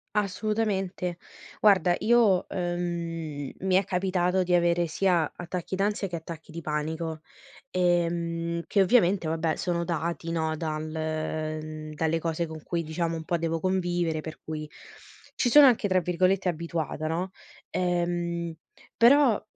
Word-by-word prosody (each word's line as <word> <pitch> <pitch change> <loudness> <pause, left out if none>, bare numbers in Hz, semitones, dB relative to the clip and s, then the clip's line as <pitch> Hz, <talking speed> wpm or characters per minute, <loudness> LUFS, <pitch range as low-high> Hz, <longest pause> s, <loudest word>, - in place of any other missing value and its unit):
Assolutamente. 195 -3 -1 0.4
Guarda, 190 -4 +5
io 220 -5 +3
ehm, 170 -4 -3
mi 190 0 0
è 195 - +3
capitato 185 0 +1
di 180 0 +1
avere 175 0 +3
sia 170 -1 +1
attacchi 175 +1 -4
d'ansia 200 0 0
che 175 - -4
attacchi 160 0 -9
di 170 +1 -7
panico, 155 +1 -3 0.5
ehm, 170 -1 0
che 200 - +2
ovviamente 190 -4 +3
vabbè 160 0 0
sono 170 -1 -1
dati 170 0 -3
no 160 -1 -1
dal 155 -1 -3
mhmm, 155 -1 -4
dalle 160 +1 0
cose 165 +1 -1
con 160 -1 -9
cui, 170 -1 -2
diciamo, 165 +1 -2
un 160 - -6
po' 170 - 0
devo 165 -1 -1
convivere 175 -3 0
per 160 0 -8
cui 155 -1 -5 0.7
ci 245 - +1
sono 295 +2 +9
anche 235 -5 +3
tra 185 -1 +3
virgolette 185 +2 +1
"abituata", 165 -2 -3
no. 175 +4 -2 0.4
Ehm, 175 -1 -1 0.4
però 250 -1 +5
170 Hz, 140 wpm, -27 LUFS, 160-185 Hz, 0.7 s, sono